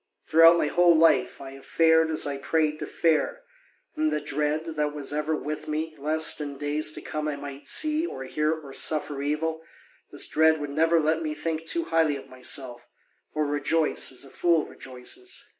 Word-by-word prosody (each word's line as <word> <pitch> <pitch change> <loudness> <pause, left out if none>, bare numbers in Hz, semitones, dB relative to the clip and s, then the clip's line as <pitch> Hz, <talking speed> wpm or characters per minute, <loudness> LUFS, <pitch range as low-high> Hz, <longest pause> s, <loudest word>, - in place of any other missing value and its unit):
Throughout 165 +1 +7
my - - +1
whole 175 +1 +4
life 130 -6 +3
I 135 -1 -8
have 135 0 -13
fared 160 -1 +4
as 155 - +1
I 140 -1 -3
prayed 155 +1 0
to - - -5
fare, 175 - 0 0.5
and 310 0 +1
the - - 0
dread 150 +2 -1
that 150 -1 -1
was 145 -1 -5
ever 150 +1 0
with 150 0 -5
me 155 +1 -3
lest 155 +2 +1
in 145 -2 -5
days 150 +2 -1
to - - -5
come 155 0 -3
I 150 - -2
might 140 0 -9
see 310 +2 +1
or 135 - -6
hear 150 +3 0
or 155 -4 -6
suffer 150 -2 0
evil, 160 +3 -2 0.5
this - - -2
dread 160 0 +3
would 145 -1 -5
never 165 +3 +3
let 160 +1 +1
me 155 -1 -3
think 160 +1 -3
too 335 - 0
highly 160 - +2
of 135 -1 -9
myself, 125 -1 -5 0.5
or 155 0 +1
rejoice 145 +2 0
as 130 +1 -9
a 135 - -14
fool 170 -3 +2
rejoices. 135 - -8
155 Hz, 190 wpm, -26 LUFS, 145-160 Hz, 0.5 s, Throughout